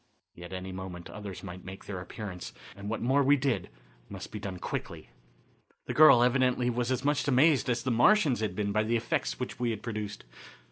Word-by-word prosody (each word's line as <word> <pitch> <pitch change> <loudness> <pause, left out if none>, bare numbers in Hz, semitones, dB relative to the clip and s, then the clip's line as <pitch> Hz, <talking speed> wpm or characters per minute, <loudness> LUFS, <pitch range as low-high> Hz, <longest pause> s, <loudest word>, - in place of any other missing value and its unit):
Yet 85 +1 -10
at 95 - -3
any 95 +1 -7
moment 95 -2 -7
others 105 -3 -8
might 90 -1 -8
make 95 +1 -9
their 95 -3 -5
appearance, 95 -1 -7 0.2
and 100 +1 -7
what 115 - -3
more 135 +4 +3
we 140 +1 +5
did 135 -2 -1 0.4
must - - -8
be 105 - -5
done 95 -2 -5
quickly. - - -5 0.8
The - - -3
girl 135 -6 +8
evidently 125 -1 +2
was 120 +1 -1
as 130 +1 -1
much 145 0 +1
amazed 140 0 +4
as 120 0 0
the 130 - 0
Martians 135 - +4
had 105 -4 -2
been 100 0 -1
by 110 +1 +2
the 115 +2 +1
effects 60 - -2
which - - -5
we 120 -1 0
had 110 -2 -4
produced. 105 -3 -5
115 Hz, 205 wpm, -29 LUFS, 95-130 Hz, 0.8 s, girl